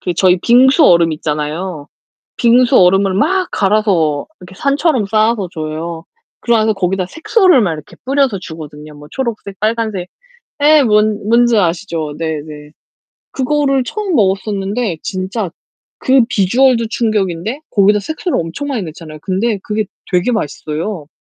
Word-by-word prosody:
그 180 - -2
저희 185 +1 +4
빙수 265 - +5
얼음 170 - +4
있잖아요. 150 +1 -4 0.5
빙수 245 +2 +4
얼음을 190 +1 +4
막 365 - +1
갈아서 195 -8 +1
이렇게 180 +1 -13
산처럼 280 - +1
쌓아서 215 -1 +1
줘요. 160 +1 -5 0.4
그리고 235 -1 +2
나서 220 0 +2
거기다 190 -1 -1
색소를 355 - +3
막 180 -5 0
이렇게 150 -2 -12
뿌려서 270 -5 +1
주거든요. 155 -3 -10
뭐 145 0 -13
초록색 220 -5 -5
빨간색. 215 -4 -1 0.5
네 300 0 +5
뭔 210 -2 +1
뭔지 235 0 +4
아시죠? 165 -4 -1
네네. 150 -2 -5 0.6
그거를 275 0 0
처음 395 - -3
먹었었는데 200 - 0
진짜 190 0 -3 0.5
그 265 -1 +4
비주얼도 235 +4 +2
충격인데 215 - -1
거기다 205 0 +3
색소를 315 - -3
엄청 170 - -5
많이 245 -7 -2
넣잖아요. 155 -2 -10
근데 200 +4 -1
그게 215 0 -1 0.3
되게 180 +6 +1
맛있어요. 155 - -4
200 Hz, 325 characters per minute, -15 LUFS, 170-240 Hz, 0.6 s, 빙수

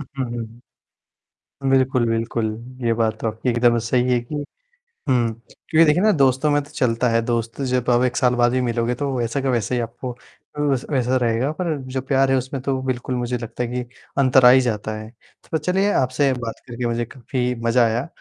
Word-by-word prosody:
उ - - -4 0.2
हुँ, 130 - 0
हुँ। 120 0 -9 0.9
बिल्कुल, 130 -2 +3
बिल्कुल, 115 0 -1 0.4
ये 115 - +3
बात 110 -1 0
तो - - -2
आपकी 110 +3 -3
एकदम 120 0 +3
सही 125 +2 +1
है 120 - +3
कि 120 +6 -9 0.8
हुँ 120 -3 +2 0.4
क्योंकि 165 0 +6
देखिए 155 +4 +3
ना 215 - +5
दोस्तों 135 -2 +2
में 145 - +3
तो 145 - -16
चलता 120 -1 0
है 115 0 +2
दोस्त 115 +1 -2
जब 125 -1 0
अब 120 +1 +4
1 125 -2 0
साल 125 -1 +3
बाद 120 0 +3
भी 130 - +1
मिलोगे 120 0 0
तो 140 +1 -2
वैसा 120 +3 -1
का 135 - -1
वैसे 120 -1 0
ही 120 - 0
आपको, 120 +2 -5 0.5
वै 145 -2 +2 0.2
वैसा 130 0 +1
रहेगा, 120 +3 0
पर 160 -2 -2
जो 130 0 -2
प्यार 135 0 +2
है 135 - +4
उसमें 130 +1 -4
तो 130 0 -1
बिल्कुल 130 -1 -2
मुझे 125 0 -2
लगता 120 +1 -5
है 120 - -3
कि 125 +1 -2 0.4
अंतर 130 -1 +5
आ - - +10
ही 130 +1 +7
जाता 110 -3 -2
है। 110 0 -9 0.4
तो 160 - +2
चलिए 190 +6 +1
आपसे 130 +2 +2
बात 115 -3 -5
करके 120 0 -4
मुझे 120 0 -1
काफ़ी 125 0 -3
मज़ा 115 +1 +4
आया। 115 +6 -1
125 Hz, 210 wpm, -21 LUFS, 115-130 Hz, 0.9 s, आ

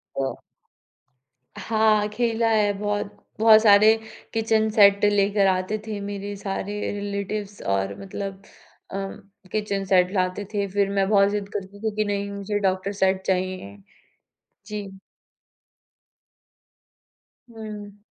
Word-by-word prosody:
तो 135 -1 -1 1.3
हाँ, 215 -1 +2
खेला 230 +1 0
है 210 -2 +3
बहुत। 205 0 -3 0.2
बहुत 220 -1 +8
सारे 215 +1 +7 0.4
किचन 220 -1 +2
सेट 200 -2 +5
लेकर 205 -1 +3
आते 185 +3 0
थे 215 -2 -4
मेरे 200 0 -5
सारे 200 +1 -4 0.2
रिलेटिव्स 200 0 -4
और 95 0 -1
मतलब 195 0 -6 0.5
उम, 195 0 -4 0.4
किचन 205 -2 -1
सेट 185 -1 +3
लाते 185 +1 -1
थे। 200 -1 0
फिर 200 0 +1
मैं 195 -1 +1
बहुत 200 -1 +5
ज़िद 205 -1 -3
करती 200 0 -6
थी 220 -1 -2
कि 215 - +1
नहीं 200 -1 -2
मुझे 200 +1 -3
डॉक्टर 190 0 0
सेट 190 -1 +1
चाहिए, 185 - -2 0.9
जी। 210 -1 -5 2.6
हुँ। 210 -2 -9
205 Hz, 120 wpm, -24 LUFS, 195-210 Hz, 2.6 s, बहुत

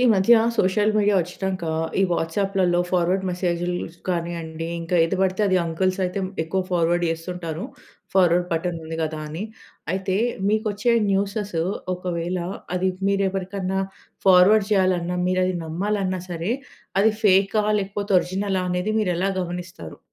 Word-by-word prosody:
ఈ - - +2
మధ్య 195 +4 +5 0.2
social 210 +2 +2
media 205 -1 +3
ఒచ్చినాక, 185 +1 -4 0.4
ఈ - - +5
వాట్సాప్‌లలో 180 +1 +1
ఫార్వర్డ్ 185 +1 +1
మెసేజులు 175 -1 -1 0.3
కానియండి, 165 -2 -3
ఇంకా 165 +2 -1
ఏది 165 +4 -1
బడితే 190 +2 +1
అది 190 -1 +3
అంకుల్స్ 185 +3 0
అయితే 180 +2 -2 0.2
ఎక్కువ 190 +4 -1
ఫార్వర్డ్ 175 0 +2
చేస్తుంటారు. 165 +1 -4 0.5
ఫార్వర్డ్ 180 -2 +4
బటన్ 165 +1 -1
ఉంది 160 0 -5
కదా 155 0 -3
అని 160 +5 -5 0.5
అయితే 190 0 -1 0.3
మీకొచ్చే 215 +2 +1 0.2
న్యూసెసు 200 -3 -1 0.3
ఒకవేళ 180 0 -3 0.4
అది 185 +1 +1 0.2
మీరు 200 0 +2
ఎవరికన్నా 190 0 -2 0.5
ఫార్వర్డ్ 195 +3 +6
చేయాలన్నా, 185 -3 +2
మీరు 185 0 +2
అది 185 - -1
నమ్మాలన్నా 185 +3 -1
సరే, 170 +5 -2 0.5
అది 220 +2 +4
ఫేకా 195 +2 +4 0.2
లేకపోతే 200 +1 -3
ఒరిజినలా 190 +1 -2
అనేది 180 +4 -1
మీరు 190 -4 +1
ఎలా 195 +2 +1
గమనిస్తారు? 180 +2 -6
185 Hz, 135 wpm, -23 LUFS, 175-195 Hz, 0.5 s, ఫార్వర్డ్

